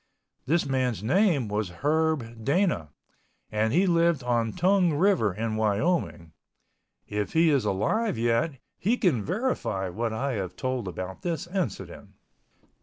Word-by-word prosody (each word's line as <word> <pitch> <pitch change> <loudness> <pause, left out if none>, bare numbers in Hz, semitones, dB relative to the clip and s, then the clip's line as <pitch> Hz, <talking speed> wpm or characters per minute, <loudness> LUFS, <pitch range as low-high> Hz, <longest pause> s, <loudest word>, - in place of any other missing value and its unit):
This 165 +4 +2
man's 130 -6 -1
name 155 - +2
was 105 -2 -2
Herb 150 -7 0
Dana, 145 - +1 0.6
and 110 +1 +1
he 180 +9 +3
lived 170 -5 +2
on 120 -2 +1
Tongue 180 -1 +2
River 175 - +3
in 110 +3 -3
Wyoming. 110 - 0 0.7
If 105 0 -3
he 160 0 +4
is 140 -3 +2
alive 210 - 0
yet 120 +7 +1 0.3
he 225 +6 +1
can 165 - +1
verify 180 - -1
what 115 +5 -2
I 135 +5 -2
have 95 -5 -4
told 130 -3 -2
about 95 +1 -6
this 170 -2 -2
incident. 175 - -5
130 Hz, 135 wpm, -27 LUFS, 110-170 Hz, 0.7 s, he